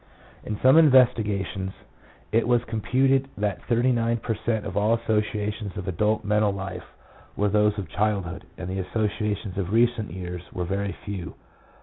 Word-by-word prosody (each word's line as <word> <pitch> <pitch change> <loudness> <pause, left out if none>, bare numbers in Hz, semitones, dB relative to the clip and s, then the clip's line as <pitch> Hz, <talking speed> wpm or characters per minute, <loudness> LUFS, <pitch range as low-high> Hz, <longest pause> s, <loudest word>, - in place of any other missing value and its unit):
In 105 -1 -4
some 130 +4 +6
investigations, 105 - +3 0.6
1 115 - +4
it - - -4
was 120 -1 +3
computed 130 +4 +1
that 105 -1 -1
thirty 120 +2 +2
nine 115 -1 +1
per 115 0 -2
cent, 110 0 -2
of 95 - -5
all 105 +3 +3
associations 105 -2 -2
of 100 -2 -5
adult 105 +5 +1
mental 105 0 +2
life 95 -1 -7 0.4
were 105 0 +1
those 105 +1 +2
of 100 -4 -4
childhood, 100 -3 -1
and 90 - -6
the 95 +1 -3
associations 105 0 -2
of 95 -1 -2
recent 115 -3 +2
years 90 0 -6
were 90 - -3
very 100 +2 -2
few. 95 -5 -5
105 Hz, 160 wpm, -25 LUFS, 100-115 Hz, 0.6 s, some